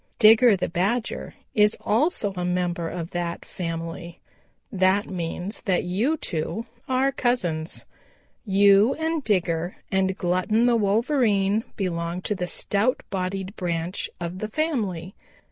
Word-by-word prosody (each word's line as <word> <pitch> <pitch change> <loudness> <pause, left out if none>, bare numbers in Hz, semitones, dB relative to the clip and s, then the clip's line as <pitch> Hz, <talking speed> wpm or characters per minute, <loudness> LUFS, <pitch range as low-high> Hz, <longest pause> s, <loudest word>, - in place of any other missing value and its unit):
Digger 225 0 +7
the 185 - -1
Badger 205 +8 -1 0.2
is 210 0 +4
also 225 - +1
a 180 - -3
member 175 -2 -1
of 170 0 -5
that 175 -1 -3
family. 170 0 -5 0.5
That 190 0 +3
means 180 +2 -4
that 190 -4 +2
you 215 - 0
two 190 - -3 0.2
are 260 +1 +2
cousins. 180 -12 -1 0.6
You 200 +3 +5
and 320 -1 -1
Digger 175 -5 0 0.2
and 190 -1 +1
Glutton 185 +6 +1
the 245 -1 +4
Wolverine 215 -1 +2
belong 175 -2 -2
to - - 0
the 180 -3 -3
stout 205 +7 +1
bodied 190 +1 -3
branch 170 0 -2
of 175 +1 -5
the 215 - -3
family. 210 - -2
195 Hz, 130 wpm, -25 LUFS, 175-220 Hz, 0.6 s, Digger